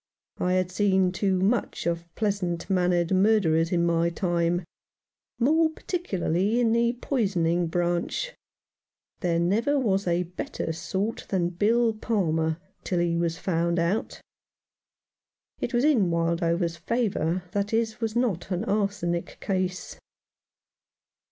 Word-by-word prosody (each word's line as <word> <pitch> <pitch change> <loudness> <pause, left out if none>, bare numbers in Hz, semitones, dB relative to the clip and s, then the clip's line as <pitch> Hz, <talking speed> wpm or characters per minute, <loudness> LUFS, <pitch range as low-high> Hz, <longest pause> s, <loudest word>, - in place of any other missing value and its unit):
I 180 0 +1
had 185 -1 +1
seen 190 -1 +2
too 190 0 0
much 210 +4 0
of 170 0 -2
pleasant 195 -5 -1
mannered 180 -2 +2
murderers 185 -5 +3
in 170 -1 +2
my 170 0 +2
time, 175 0 0 0.7
more 315 +6 +3
particularly 210 - -1
in 235 -2 +3
the 235 +1 +2
poisoning 185 - 0
branch. 175 - -1 0.9
There 175 -3 0
never 220 +12 +2
was 200 -7 +1
a 175 +1 +2
better 170 -2 -4
sort 195 +7 -3
than 175 -3 +1
Bill 225 +6 +2
Palmer 165 -8 0 0.3
till 180 - -1
he 170 -1 +1
was 170 0 0
found 170 -1 0
out. 170 +6 -1 1.4
It - - -2
was 240 0 +1
in 250 - +4
Wildover's 170 0 0
favour 185 -4 -1
that 205 0 -1
his 225 +1 -1
was 225 -1 -2
not 210 -8 0
an 180 -2 -2
arsenic 195 -4 -1
case. 185 -1 -3
185 Hz, 125 wpm, -26 LUFS, 170-215 Hz, 1.4 s, in